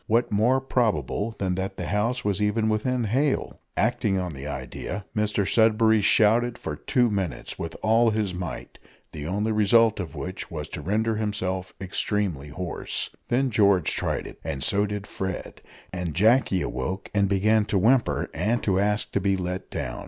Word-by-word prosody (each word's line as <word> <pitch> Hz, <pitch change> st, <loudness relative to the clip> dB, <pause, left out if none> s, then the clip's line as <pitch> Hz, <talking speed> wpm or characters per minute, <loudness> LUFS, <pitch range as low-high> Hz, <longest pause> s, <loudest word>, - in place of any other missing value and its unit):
What 115 Hz, +2 st, +2 dB
more 115 Hz, +6 st, +3 dB
probable 115 Hz, -, 0 dB
than 95 Hz, -2 st, -1 dB
that 95 Hz, +1 st, -3 dB
the 90 Hz, -, -4 dB
house 110 Hz, +7 st, -1 dB
was 100 Hz, 0 st, 0 dB
even 105 Hz, +2 st, +1 dB
then 110 Hz, -, +2 dB
within 120 Hz, +3 st, 0 dB
hail? 130 Hz, +7 st, 0 dB, 0.2 s
Acting 110 Hz, -3 st, +1 dB
on 90 Hz, -3 st, -3 dB
the 70 Hz, +1 st, -7 dB
idea, 70 Hz, +8 st, -5 dB
Mr 105 Hz, -1 st, +1 dB
Sudberry 110 Hz, -1 st, +4 dB
shouted 115 Hz, +3 st, +4 dB
for -, -, -5 dB
two 125 Hz, -2 st, +1 dB
minutes 95 Hz, -5 st, -3 dB
with 80 Hz, -1 st, -5 dB
all 115 Hz, +2 st, +4 dB
his 105 Hz, -3 st, -1 dB
might, 90 Hz, -3 st, -6 dB, 0.3 s
the 75 Hz, -1 st, -6 dB
only 105 Hz, +5 st, 0 dB
result 110 Hz, +1 st, +4 dB
of 85 Hz, -3 st, -5 dB
which 90 Hz, +6 st, -6 dB
was 75 Hz, -4 st, -6 dB
to -, -, -6 dB
render 110 Hz, +3 st, 0 dB
himself 95 Hz, -4 st, -3 dB
extremely 95 Hz, -5 st, -1 dB
hoarse. 85 Hz, +3 st, -4 dB, 0.2 s
Then 130 Hz, +2 st, +1 dB
George 100 Hz, -6 st, +3 dB
tried -, -, -2 dB
it, -, -, -10 dB
and 65 Hz, -1 st, -3 dB
so 105 Hz, +1 st, +2 dB
did 105 Hz, 0 st, -4 dB
Fred, 95 Hz, -2 st, -5 dB, 0.3 s
and 90 Hz, -4 st, -3 dB
Jacky 110 Hz, -1 st, +3 dB
awoke 90 Hz, +10 st, -4 dB
and 100 Hz, -1 st, +2 dB
began 105 Hz, +2 st, +3 dB
to 105 Hz, -, 0 dB
whimper 95 Hz, -, +2 dB
and 115 Hz, +2 st, 0 dB
to 95 Hz, -2 st, +2 dB
ask 105 Hz, +1 st, +1 dB
to 100 Hz, -, 0 dB
be 95 Hz, 0 st, +1 dB
let 90 Hz, 0 st, -4 dB
down. -, -, -4 dB
105 Hz, 175 wpm, -25 LUFS, 90-110 Hz, 0.3 s, Sudberry